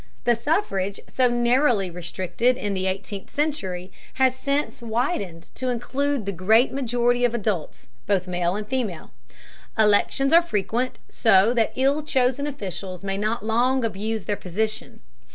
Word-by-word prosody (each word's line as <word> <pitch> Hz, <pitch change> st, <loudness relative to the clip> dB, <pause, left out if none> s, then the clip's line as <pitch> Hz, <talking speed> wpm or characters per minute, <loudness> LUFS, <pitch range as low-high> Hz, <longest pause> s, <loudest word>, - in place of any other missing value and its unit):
The 240 Hz, -, +4 dB
suffrage, 225 Hz, -, -1 dB
so 255 Hz, -1 st, +2 dB
narrowly 240 Hz, -4 st, +2 dB
restricted 185 Hz, +8 st, -1 dB
in 205 Hz, -5 st, -2 dB
the 190 Hz, 0 st, -1 dB
eighteenth 195 Hz, +1 st, -4 dB
century, 190 Hz, -, -2 dB, 0.2 s
has 260 Hz, -1 st, +3 dB
since 280 Hz, 0 st, -1 dB
widened 220 Hz, -, -2 dB
to 255 Hz, -, -3 dB
include 260 Hz, +1 st, -1 dB
the 200 Hz, -, -1 dB
great 215 Hz, +8 st, +3 dB
majority 245 Hz, -2 st, +1 dB
of 240 Hz, -1 st, +2 dB
adults, 205 Hz, -8 st, -3 dB, 0.2 s
both 195 Hz, -3 st, +1 dB
male 175 Hz, 0 st, -1 dB
and 210 Hz, 0 st, -4 dB
female. 225 Hz, -10 st, -3 dB, 0.7 s
Elections 220 Hz, +7 st, +3 dB
are 335 Hz, -, +8 dB
frequent, 235 Hz, -, -1 dB
so 220 Hz, 0 st, +4 dB
that 230 Hz, -2 st, +1 dB
ill 275 Hz, +3 st, +2 dB
chosen 265 Hz, -1 st, +1 dB
officials 190 Hz, -, -6 dB
may 195 Hz, -1 st, -2 dB
not 215 Hz, +1 st, -1 dB
long 245 Hz, +3 st, +2 dB
abuse 220 Hz, 0 st, -2 dB
their 205 Hz, -, -1 dB
position. 215 Hz, -, -3 dB
225 Hz, 145 wpm, -24 LUFS, 195-255 Hz, 0.7 s, are